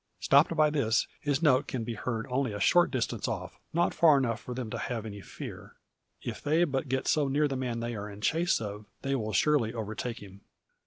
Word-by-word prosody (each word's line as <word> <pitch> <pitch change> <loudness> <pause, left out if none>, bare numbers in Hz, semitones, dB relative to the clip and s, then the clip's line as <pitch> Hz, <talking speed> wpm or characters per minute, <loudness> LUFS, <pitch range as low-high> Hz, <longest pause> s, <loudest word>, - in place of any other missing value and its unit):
Stopped 145 +4 +4
by 155 -1 +4
this 120 -7 +2
his 145 +2 -1
note 145 -2 +4
can 125 -3 -3
be 115 +1 -4
heard 115 +1 -3
only 125 -3 0
a 105 - -4
short 175 +12 +5
distance 130 -4 -2
off, - - -5
not 170 +1 +1
far 155 -4 +6
enough 120 -4 0
for 125 - -7
them 120 -4 -4
to - - -3
have 115 -4 -3
any 100 -2 -7
fear. - - -9 0.5
If - - -5
they 155 +4 +3
but 135 -3 -1
get 130 0 -1
so 150 -3 +3
near 145 +2 +2
the 135 - -3
man 125 -3 -2
they 120 +1 -3
are 105 0 -5
in 100 0 -10
chase 165 +9 +2
of, 105 -1 -6 0.2
they 135 0 0
will 110 -5 -1
surely 125 -4 +2
overtake 110 +2 -4
him. 100 -1 -12
125 Hz, 220 wpm, -29 LUFS, 110-145 Hz, 0.5 s, far